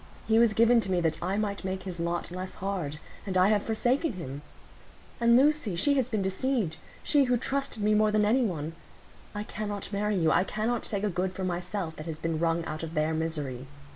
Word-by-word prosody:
He 225 0 +4
was 230 -2 +5
given 230 +1 +5
to 190 - -3
me 180 - +2
that 165 -2 0
I 190 +3 -1
might 205 -2 -2
make 190 0 -3
his 180 -3 -6
lot 170 +1 -2
less 185 +1 -5
hard; 185 -7 -3 0.3
and 190 -2 -1
I 185 +2 +5
have 210 -1 +3
forsaken 245 +7 0
him. 145 -6 -6 0.8
And 235 0 +5
Lucy—she 285 - +3
has 260 -3 +1
been 215 -5 0
deceived; 190 -2 0 0.3
she 285 -2 +4
who 250 -1 +2
trusted 270 -3 -2
me 210 +1 +3
more 215 0 +4
than 210 0 +3
any 240 +5 +3
one. 165 -7 -2 0.6
I 210 - -2
cannot 205 -1 -5
marry 210 +1 0
you; 165 -4 +3
I - - +4
cannot 220 +4 -2
take 200 -1 -2
a 210 - +2
good 185 +1 -1
for 190 - -5
myself 180 -1 -3
that 155 - -7
has 160 -2 -4
been 165 -1 -2
wrung 165 0 +1
out 155 - -5
of 165 0 -6
their 155 +1 +1
misery. 150 -5 -3
195 Hz, 215 wpm, -28 LUFS, 170-220 Hz, 0.8 s, was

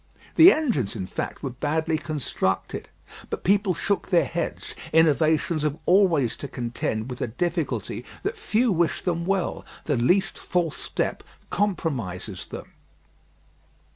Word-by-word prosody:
The 340 +4 +10
engines, 160 - 0
in 95 -4 -3
fact, - - -5
were 135 - -2
badly 155 +5 0
constructed. 145 - -2 0.4
But - - -4
people 195 -1 +3
shook 200 -1 -1
their 175 -3 +4
heads. 170 0 -3 0.2
Innovations 160 0 +3
have 150 0 0
always 170 - +4
to 140 - -5
contend 120 -3 -3
with 125 - -6
the - - -1
difficulty 170 +7 -2 0.2
that 410 +4 -1
few 245 - +1
wish 170 -3 +1
them 170 -1 -1
well. 195 -2 0 0.2
The 145 -4 0
least 180 +12 +2
false 175 -4 -1
step - - -2 0.3
compromises 120 - -2
them. - - -8
160 Hz, 135 wpm, -25 LUFS, 130-190 Hz, 0.4 s, The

